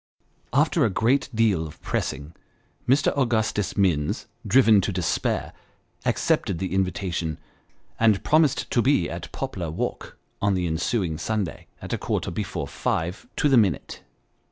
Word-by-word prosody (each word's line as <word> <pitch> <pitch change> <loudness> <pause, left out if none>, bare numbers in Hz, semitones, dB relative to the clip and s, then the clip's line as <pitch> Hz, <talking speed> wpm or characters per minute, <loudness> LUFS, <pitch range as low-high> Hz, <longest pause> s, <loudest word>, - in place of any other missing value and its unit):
After 150 +4 +3
a 115 - +3
great 120 +9 +1
deal 110 -8 +2
of 75 - -13
pressing, 75 +4 -3 0.6
Mr. 140 +3 +3
Augustus 110 -7 0
Minns, 85 -7 +1 0.2
driven 115 -6 +6
to 100 - -1
despair, 90 -2 -1 0.5
accepted - - +1
the 95 +1 -3
invitation, 90 -4 -1 0.6
and 110 -3 +3
promised 155 -3 +2
to 120 - +3
be 115 -7 +3
at - - -6
Poplar 85 -3 -4
Walk 80 - -4 0.2
on 100 -1 +2
the 90 -1 0
ensuing 85 0 -1
Sunday, 105 -2 -3 0.2
at - - -5
a - - -1
quarter - - -2
before - - -3
five 85 +4 -2
to - - +2
the 135 -3 +5
minute. 95 - +1
100 Hz, 140 wpm, -25 LUFS, 85-120 Hz, 0.6 s, driven